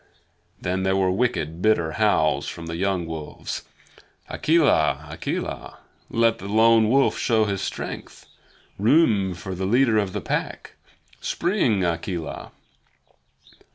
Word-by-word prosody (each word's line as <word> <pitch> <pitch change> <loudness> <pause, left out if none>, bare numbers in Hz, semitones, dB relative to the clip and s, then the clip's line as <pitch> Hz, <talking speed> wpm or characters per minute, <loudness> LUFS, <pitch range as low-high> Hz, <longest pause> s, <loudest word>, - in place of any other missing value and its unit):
Then 95 +1 -2
there 95 0 +1
were 95 -1 +2
wicked, 90 -7 -1
bitter 95 -7 +2
howls 80 - +1
from 85 - -7
the 80 0 -5
young 95 -1 -1
wolves: 80 -2 -6 0.7
"Akela! 80 - +2
Akela! 80 - -5 0.3
Let 115 -1 +2
the 100 - -7
Lone 110 +1 +4
Wolf 135 +3 +3
show 110 -2 +2
his 100 -2 -2
strength. - - -6 0.5
Room 105 - +3
for 95 +2 -7
the 95 +1 -3
leader 115 0 +3
of 100 -3 -2
the - - -2
Pack! - - -4 0.5
Spring, 130 - 0
Akela!" 85 -1 -4
95 Hz, 120 wpm, -23 LUFS, 85-115 Hz, 0.7 s, Lone